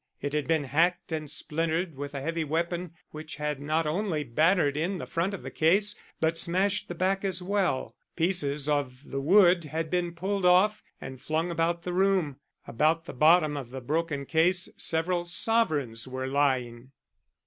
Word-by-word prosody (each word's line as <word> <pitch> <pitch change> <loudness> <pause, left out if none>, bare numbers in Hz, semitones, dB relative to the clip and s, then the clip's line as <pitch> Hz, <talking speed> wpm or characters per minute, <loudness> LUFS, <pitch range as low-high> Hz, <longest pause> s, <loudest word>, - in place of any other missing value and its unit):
It 145 - -4
had 150 -1 -1
been 160 -2 +2
hacked 165 +7 +1
and 155 -2 -3
splintered 165 +3 -2
with 145 +1 -6
a 140 - -3
heavy 165 +1 -1
weapon, 170 +2 -2 0.2
which 155 +1 -8
had 150 -2 -3
not 155 +3 0
only 160 -1 -1
battered 150 +3 +2
in 175 +6 -1
the - - -6
front 170 +4 -1
of 200 - -7
the - - -7
case, 200 +6 +2 0.3
but 165 +1 0
smashed 190 +4 0
the 175 - -6
back 190 +3 0
as 190 -2 -1
well. 190 -7 -1 0.2
Pieces 150 -5 0
of 140 -3 -1
the 135 0 -4
wood 175 +1 +5
had 160 +1 -4
been 175 -1 -1
pulled 195 +3 -2
off 190 +4 +4 0.2
and 130 -1 -9
flung 160 +4 -1
about 170 0 -1
the 180 - -4
room. 185 -7 +1 0.3
About 155 +7 +1
the - - -8
bottom 155 +2 +4
of 135 -4 -6
the 130 +1 -6
broken 150 +2 -2
case 175 +5 +2
several 175 +2 0
sovereigns 155 - 0
were 130 0 -4
lying. 130 -3 0
165 Hz, 175 wpm, -28 LUFS, 145-180 Hz, 0.3 s, wood